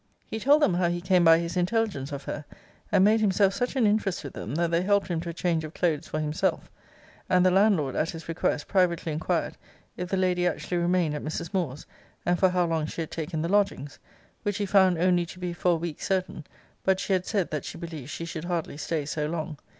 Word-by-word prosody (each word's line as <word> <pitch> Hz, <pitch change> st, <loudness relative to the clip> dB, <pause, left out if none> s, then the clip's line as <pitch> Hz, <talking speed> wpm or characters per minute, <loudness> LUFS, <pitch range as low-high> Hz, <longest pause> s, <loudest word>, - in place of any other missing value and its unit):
'He 220 Hz, -, -5 dB
told 290 Hz, +6 st, +4 dB
them 190 Hz, -, +4 dB
how 175 Hz, 0 st, +2 dB
he 175 Hz, 0 st, -1 dB
came 180 Hz, 0 st, +3 dB
by 165 Hz, -1 st, +7 dB
his 170 Hz, +1 st, -3 dB
intelligence 180 Hz, -6 st, 0 dB
of 140 Hz, -1 st, -5 dB
her; 145 Hz, -, -5 dB, 0.5 s
and 185 Hz, -, +5 dB
made 220 Hz, +1 st, +4 dB
himself 195 Hz, -1 st, +3 dB
such 245 Hz, +5 st, -2 dB
an 255 Hz, -4 st, +3 dB
interest 205 Hz, -4 st, +1 dB
with 140 Hz, -, -7 dB
them, 120 Hz, -, -5 dB
that 170 Hz, 0 st, 0 dB
they 170 Hz, 0 st, +2 dB
helped 200 Hz, +1 st, +2 dB
him 165 Hz, -2 st, -1 dB
to 170 Hz, -, -5 dB
a -, -, -4 dB
change 165 Hz, -1 st, 0 dB
of 155 Hz, +1 st, -8 dB
clothes 160 Hz, -3 st, 0 dB
for 155 Hz, -, -3 dB
himself; 150 Hz, 0 st, -1 dB, 0.6 s
and 180 Hz, 0 st, +4 dB
the 185 Hz, -, +5 dB
landlord, 190 Hz, -8 st, +3 dB
at 160 Hz, -, 0 dB
his 165 Hz, -1 st, -7 dB
request, 165 Hz, -3 st, -1 dB
privately 175 Hz, -4 st, +1 dB
inquired, 155 Hz, +1 st, -1 dB, 0.4 s
if 180 Hz, 0 st, -4 dB
the 195 Hz, -, 0 dB
lady 180 Hz, -1 st, +2 dB
actually 175 Hz, +1 st, -2 dB
remained 175 Hz, -2 st, +1 dB
at 150 Hz, -, -4 dB
Mrs. 160 Hz, +2 st, -5 dB
Moore's, 155 Hz, -7 st, -2 dB, 0.4 s
and 175 Hz, 0 st, +2 dB
for 190 Hz, -, +5 dB
how 180 Hz, -1 st, +1 dB
long 160 Hz, -2 st, -1 dB
she 165 Hz, -, -5 dB
had 160 Hz, -, -5 dB
taken 160 Hz, 0 st, -3 dB
the -, -, 0 dB
lodgings? 195 Hz, -7 st, 0 dB, 0.4 s
which 205 Hz, -2 st, -2 dB
he 205 Hz, -, -1 dB
found 190 Hz, -3 st, +4 dB
only 180 Hz, 0 st, +3 dB
to 180 Hz, -, -10 dB
be 180 Hz, -1 st, -4 dB
for 175 Hz, +1 st, +2 dB
a -, -, +2 dB
week 165 Hz, -1 st, -5 dB
certain; 185 Hz, -5 st, -2 dB, 0.4 s
but 190 Hz, 0 st, +2 dB
she 195 Hz, -, -1 dB
had 185 Hz, -1 st, 0 dB
said, 200 Hz, -5 st, 0 dB
that 150 Hz, -3 st, -2 dB
she -, -, -7 dB
believed 160 Hz, -6 st, -7 dB
she 165 Hz, -, -5 dB
should 165 Hz, 0 st, -6 dB
hardly 170 Hz, -4 st, -3 dB
stay 155 Hz, -1 st, -2 dB
so 150 Hz, 0 st, -2 dB
long. 160 Hz, -2 st, -4 dB
175 Hz, 235 wpm, -27 LUFS, 160-190 Hz, 0.6 s, by